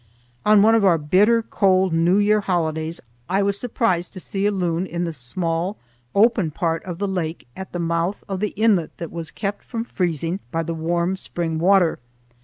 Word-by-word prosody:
On 210 -1 +6
one 225 +1 +5
of 225 -2 +3
our 180 -4 +5
bitter 205 +10 +3
cold 190 -4 +2
New 170 +3 +3
Year 210 +1 +3
holidays 165 -3 -1 0.3
I 195 +2 +2
was 200 0 0
surprised 225 -8 0
to 190 - -7
see 195 +2 -1
a - - +2
loon 180 -2 -1
in 175 0 -3
the 165 -1 -3
small 165 - -2 0.4
open 210 -4 +4
part 165 +1 -2
of 175 -2 -5
the 200 +2 -1
lake 175 -7 -3
at 190 0 -8
the - - -4
mouth 170 +3 -1
of 195 -1 -3
the 210 0 -2
inlet 205 -6 +2
that 170 - -6
was 165 -2 -6
kept 205 0 -4
from 230 -2 -4
freezing 175 - -2
by 165 -1 -1
the 165 - -3
warm 170 +3 0
spring 165 -3 -3
water. 180 -1 +3
180 Hz, 195 wpm, -22 LUFS, 165-200 Hz, 0.4 s, On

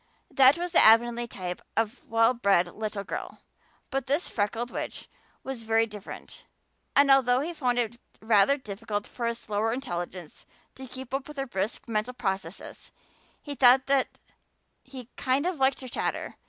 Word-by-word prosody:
That 270 +2 +6
was 350 0 -3
the 330 - +5
Avonlea 235 +2 +5
type 180 -5 -6 0.2
of 225 -1 -1
well 225 +2 +4
bred 200 -7 +3
little 210 -2 -4
girl. - - -7 0.5
But 270 0 -2
this 290 +6 +1
freckled 225 +3 -2
witch - - -5 0.4
was 265 -3 -5
very 225 0 +2
different, 210 -3 -10 0.5
and 280 0 +6
although 255 -1 +4
he 335 +4 -4
found 250 -6 0
it 235 0 -1 0.2
rather 220 +5 +4
difficult 205 -3 -5
for 235 -2 -4
his 235 0 -2
slower 215 -1 -1
intelligence 180 - -6 0.3
to 265 0 -10
keep 260 0 -9
up 270 0 -2
with 300 -1 -11
her 270 - -2
brisk 205 -3 -4
mental 230 +2 -2
processes 190 -5 -5 0.5
he 290 - -6
thought 260 0 +5
that 275 -1 +3 0.8
he 260 -3 -10
"kind 270 +3 0
of 360 -4 -2
liked 265 +1 +2
her 260 - -7
chatter." 240 - -3
240 Hz, 165 wpm, -27 LUFS, 215-270 Hz, 0.8 s, That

